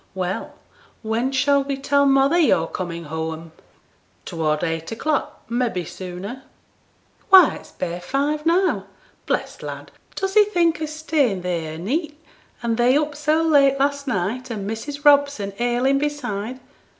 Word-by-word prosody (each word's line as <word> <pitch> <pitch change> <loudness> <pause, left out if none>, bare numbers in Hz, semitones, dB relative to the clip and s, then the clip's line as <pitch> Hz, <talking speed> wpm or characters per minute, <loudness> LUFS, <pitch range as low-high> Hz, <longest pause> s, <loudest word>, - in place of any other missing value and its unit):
'Well! 190 +11 -3 0.5
when 230 +4 -1
shall 280 +1 +2
we 275 0 -3
tell 280 +1 +2
mother 275 +5 +4
yo're 220 - +3
comin' 170 0 -5
whoam?' 160 +1 -5 0.7
'Toward 155 -2 -1
eight 165 -1 -3
o'clock 295 +6 -2
may 240 +1 0
be 180 -5 -4
sooner.' 185 +9 -7 0.9
'Why 375 -4 +8
it's - - -14
bare 175 -1 -4
five 285 +9 -1
now! 355 +3 +1 0.4
bless - - -2
t' - - -10
lad, - - -8 0.2
does 385 0 -2
he 425 0 +7
think 345 -6 +1
o' 310 - -1
staying 300 - 0
theere 170 -3 -3
a' - - -7
neet, 295 - -3 0.4
and 230 -1 0
they 245 +3 +4
up 300 -1 -1
so 305 +2 +1
late 280 -4 +4
last 280 0 0
night, 235 +4 -2
and 205 -4 -4
Mrs. 285 +7 -6
Robson 280 -9 +4
ailing 245 +3 +2
beside? 255 -5 -3
265 Hz, 150 wpm, -22 LUFS, 190-295 Hz, 0.9 s, Why